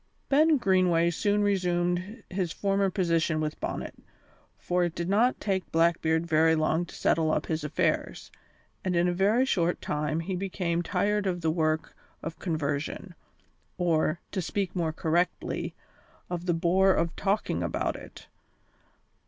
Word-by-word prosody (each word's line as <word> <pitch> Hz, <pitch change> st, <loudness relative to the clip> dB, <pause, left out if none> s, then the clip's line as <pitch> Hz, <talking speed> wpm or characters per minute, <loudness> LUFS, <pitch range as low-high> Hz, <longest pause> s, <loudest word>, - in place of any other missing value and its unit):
Ben 305 Hz, +2 st, +5 dB
Greenway 180 Hz, -6 st, +3 dB
soon 205 Hz, +4 st, +1 dB
resumed 180 Hz, +2 st, 0 dB
his 180 Hz, -3 st, -1 dB
former 195 Hz, +1 st, +1 dB
position 165 Hz, -4 st, +1 dB
with 155 Hz, -1 st, -3 dB
Bonnet, -, -, -4 dB, 0.6 s
for 180 Hz, 0 st, 0 dB
it 175 Hz, -2 st, -2 dB
did 170 Hz, 0 st, -3 dB
not 225 Hz, +6 st, +2 dB
take 190 Hz, -3 st, -2 dB
Blackbeard 165 Hz, 0 st, +2 dB
very 160 Hz, 0 st, +4 dB
long 160 Hz, +2 st, +1 dB
to -, -, -11 dB
settle 160 Hz, -1 st, +2 dB
up 150 Hz, -, 0 dB
his 160 Hz, -1 st, -2 dB
affairs, 150 Hz, 0 st, -1 dB, 0.5 s
and 185 Hz, -1 st, -1 dB
in 170 Hz, +1 st, +3 dB
a 175 Hz, -, +1 dB
very 205 Hz, +8 st, +3 dB
short 175 Hz, -8 st, +1 dB
time 150 Hz, +2 st, -2 dB
he 185 Hz, +3 st, -3 dB
became 180 Hz, -2 st, -1 dB
tired 200 Hz, +3 st, 0 dB
of 175 Hz, -2 st, -1 dB
the 160 Hz, -1 st, +1 dB
work 155 Hz, -1 st, -1 dB, 0.3 s
of 165 Hz, 0 st, -6 dB
conversion; 155 Hz, +2 st, -3 dB, 0.6 s
or, 170 Hz, -2 st, +1 dB
to 190 Hz, -, -2 dB
speak 195 Hz, +2 st, -2 dB
more 165 Hz, -3 st, 0 dB
correctly, 165 Hz, +3 st, -1 dB, 0.6 s
of 175 Hz, 0 st, -4 dB
the 175 Hz, -, +3 dB
bore 185 Hz, +3 st, +3 dB
of 165 Hz, 0 st, -1 dB
talking 200 Hz, +2 st, 0 dB
about -, -, -1 dB
it. -, -, -11 dB
175 Hz, 150 wpm, -28 LUFS, 165-190 Hz, 0.6 s, Ben